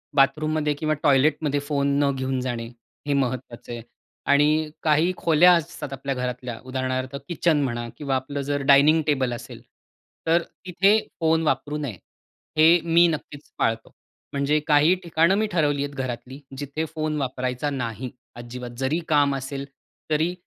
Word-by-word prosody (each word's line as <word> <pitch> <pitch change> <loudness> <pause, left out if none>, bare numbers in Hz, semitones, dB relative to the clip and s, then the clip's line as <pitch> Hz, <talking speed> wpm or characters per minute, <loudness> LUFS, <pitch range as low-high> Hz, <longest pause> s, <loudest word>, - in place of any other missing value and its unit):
बाथरूममध्ये 150 +2 +2
किंवा 155 0 +1
टॉयलेटमध्ये 145 0 +3
फोन 140 -1 -1 0.2
न 140 - +3
घेऊन 130 0 -2
जाणे, 120 -2 -3 0.4
हे 145 - +1
महत्वाचं 130 -3 -3
आहे. 120 -1 -5 0.4
आणि 150 +2 +3
काही 155 +3 +3
खोल्या 170 +2 +5
असतात 165 -4 -2
आपल्या 135 0 -3
घरातल्या 125 -1 -4
उदाहरणार्थ 130 0 -3
किचन 165 -3 +1
म्हणा 120 -2 -3
किंवा 140 -2 -1
आपलं 140 +2 -3
जर 145 +1 -2
डायनिंग 150 +4 +6
टेबल 130 -4 +1
असेल, 120 - -9 0.7
तर 165 +1 +4 0.2
तिथे 195 +4 +4 0.2
फोन 160 -1 +2
वापरू 150 0 -1
नये. 140 -10 -5 0.6
हे 165 +3 +7
मी 170 +1 +5
नक्कीच 150 -2 -6
पाळतो. 115 0 -1 0.4
म्हणजे 140 +2 +1
काही 150 +4 +5
ठिकाणं 170 +2 +3
मी 215 +1 +1
ठरवली 145 -5 +1
आहेत 145 0 -6
घरातली, 130 0 -5 0.2
जिथे 145 +3 -3
फोन 155 -1 -1
वापरायचा 130 +1 -2
नाही. 125 -3 -4 0.3
अजिबात 120 0 -8
जरी 135 +5 0
काम 145 -2 +3
असेल, 135 +1 -5 0.5
तरी 160 +3 +1
145 Hz, 145 wpm, -24 LUFS, 130-155 Hz, 0.7 s, हे